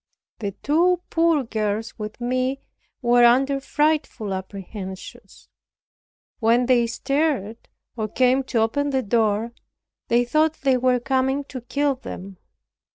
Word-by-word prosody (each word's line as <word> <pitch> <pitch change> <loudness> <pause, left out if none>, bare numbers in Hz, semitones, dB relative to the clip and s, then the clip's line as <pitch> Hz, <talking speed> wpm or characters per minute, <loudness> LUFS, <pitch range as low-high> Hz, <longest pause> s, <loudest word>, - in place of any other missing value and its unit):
The 200 -3 -3
two 350 +4 +2
poor 330 -3 +3
girls 220 -1 -3
with 210 +1 -6
me 255 +2 -1 0.4
were 240 0 +5
under 270 +3 +4
frightful 295 -8 0
apprehensions. 190 0 -8 0.9
When 230 +1 +3
any 245 -1 +3
stirred, 255 -3 -2 0.3
or 220 -2 -2
came 255 +4 +2
to 235 -3 0
open 285 +6 0
the 265 -2 0
door, 220 +1 +1 0.5
they 240 +1 +3
thought 310 +5 +1
they 265 -2 +3
were 250 0 +2
coming 265 +2 0
to 255 - -6
kill 280 +4 0
them. 195 -7 -9
245 Hz, 125 wpm, -23 LUFS, 220-275 Hz, 0.9 s, were